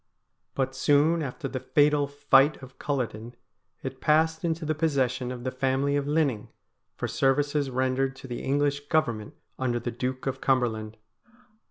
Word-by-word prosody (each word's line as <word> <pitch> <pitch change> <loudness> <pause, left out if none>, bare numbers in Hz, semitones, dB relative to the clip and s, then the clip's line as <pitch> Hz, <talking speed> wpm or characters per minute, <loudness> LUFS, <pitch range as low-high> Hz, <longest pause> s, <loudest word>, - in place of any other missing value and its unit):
But 130 -1 -1
soon 150 +5 +3
after 135 0 -4
the 130 0 -4
fatal 145 +2 +3
fight 145 0 +3
of 130 0 -13
Culloden 120 -4 -3 0.5
it 130 0 -6
passed 160 +2 +2
into 165 -1 -1
the 155 - +1
possession 130 -5 0
of 125 -1 -7
the 130 - -2
family 135 +2 0
of 145 0 -1
Linning, 145 -8 +1 0.5
for - - -3
services 145 +1 +1
rendered 130 +1 0
to 135 - -11
the 120 -1 -5
English 145 +1 0
Government 145 -4 0 0.2
under 120 -2 0
the 120 +1 -4
Duke 130 +2 -4
of 135 0 -3
Cumberland. 110 -5 0
135 Hz, 155 wpm, -27 LUFS, 130-145 Hz, 0.5 s, soon